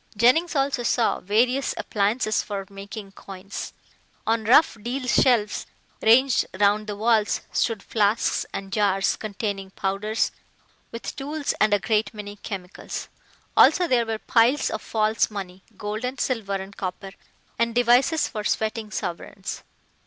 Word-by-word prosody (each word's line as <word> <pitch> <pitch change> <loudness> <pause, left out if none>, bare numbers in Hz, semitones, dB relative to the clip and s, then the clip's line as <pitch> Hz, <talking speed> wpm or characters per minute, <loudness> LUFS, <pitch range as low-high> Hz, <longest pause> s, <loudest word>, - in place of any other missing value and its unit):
Jennings 280 +10 +4
also 275 -2 +1
saw 235 -1 +1
various 245 +7 +1
appliances 215 +2 0
for 200 -2 -5
making 200 +1 -8
coins. 195 0 -8 0.5
On 225 -1 +1
rough 255 +6 +5
deal 250 +4 -3
shelves 235 -5 +2 0.3
ranged 250 +3 +5 0.2
round 210 +1 +3
the 210 - -4
walls 220 0 +2
stood 225 -4 0
flasks 210 0 +1
and 195 0 -6
jars 195 -2 +2
containing 200 -2 -4
powders, 195 +3 -1 0.6
with 230 - -6
tools 290 +1 -2
and 215 - +4
a 205 - +5
great 215 +1 0
many 205 -1 -7
chemicals. 195 -3 -7 0.5
Also 360 - +6
there 240 -5 +2
were 225 -1 -1
piles 240 +5 +2
of 220 - -3
false 220 0 +1
money, 190 -3 -7 0.2
gold 210 +2 -4
and 255 +1 -3
silver 220 -6 -1
and 195 +1 -6
copper, 190 +1 -5 0.5
and 230 0 +1
devices 245 +6 +4
for 215 -2 -5
sweating 220 +1 -1
sovereigns. 190 0 -5
215 Hz, 140 wpm, -24 LUFS, 200-240 Hz, 0.6 s, Also